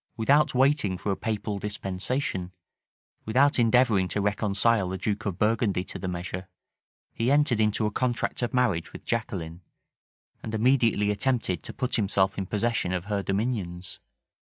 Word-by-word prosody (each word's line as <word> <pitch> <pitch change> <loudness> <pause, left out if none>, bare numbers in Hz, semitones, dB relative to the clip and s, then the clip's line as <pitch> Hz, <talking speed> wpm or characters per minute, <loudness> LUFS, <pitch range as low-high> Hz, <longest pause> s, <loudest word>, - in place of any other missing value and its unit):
Without 140 +6 +3
waiting 130 -8 +2
for 100 - -2
a - - 0
papal 105 -1 -3
dispensation; 95 0 -3 0.7
without 135 +5 +3
endeavoring 115 -5 +4
to 105 - -2
reconcile 105 0 +1
the 95 - -3
duke 105 +2 -2
of 95 -3 -3
Burgundy 105 -3 +1
to - - -7
the 95 - -4
measure; 90 +1 -5 0.6
he 115 +2 0
entered 140 -5 +3
into 110 0 +2
a 105 - 0
contract 120 +2 -1
of 120 - -1
marriage 120 -10 0
with - - -10
Jaqueline, 95 -8 -3 0.8
and 110 - -4
immediately 115 -3 +3
attempted 105 - 0
to - - -7
put 125 -2 -1
himself 95 -2 +1
in 95 - -3
possession 105 -3 0
of 90 0 -3
her 100 -1 -1
dominions. 95 -4 -3
105 Hz, 150 wpm, -27 LUFS, 95-120 Hz, 0.8 s, endeavoring